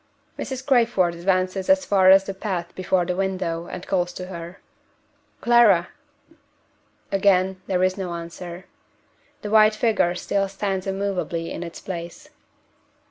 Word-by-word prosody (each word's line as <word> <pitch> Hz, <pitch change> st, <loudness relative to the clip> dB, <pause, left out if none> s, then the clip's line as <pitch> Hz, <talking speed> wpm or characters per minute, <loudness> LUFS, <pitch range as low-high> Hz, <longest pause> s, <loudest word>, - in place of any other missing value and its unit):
Mrs. 265 Hz, -1 st, -5 dB
Crayford 230 Hz, -10 st, +3 dB
advances 185 Hz, +2 st, -1 dB
as 285 Hz, 0 st, +4 dB
far 190 Hz, -4 st, +4 dB
as 190 Hz, 0 st, +7 dB
the 195 Hz, -, -5 dB
path 185 Hz, -3 st, -4 dB
before 185 Hz, -1 st, 0 dB
the 180 Hz, 0 st, -2 dB
window, 185 Hz, -3 st, -2 dB
and 180 Hz, -, -7 dB
calls 180 Hz, -2 st, 0 dB
to 180 Hz, -, -7 dB
her. 175 Hz, 0 st, -9 dB, 0.8 s
"Clara!" 230 Hz, -7 st, +5 dB, 1.2 s
Again 190 Hz, -1 st, +2 dB
there 185 Hz, -1 st, +1 dB
is 185 Hz, +1 st, +1 dB
no 180 Hz, -3 st, -4 dB
answer. 170 Hz, +2 st, -8 dB, 0.8 s
The 210 Hz, -, -4 dB
white 215 Hz, 0 st, +6 dB
figure 215 Hz, -6 st, +1 dB
still 195 Hz, +2 st, -1 dB
stands 195 Hz, -1 st, -3 dB
immovably 190 Hz, -4 st, -2 dB
in -, -, -5 dB
its 170 Hz, -1 st, -7 dB
place. 170 Hz, -2 st, -7 dB
185 Hz, 135 wpm, -23 LUFS, 175-200 Hz, 1.2 s, as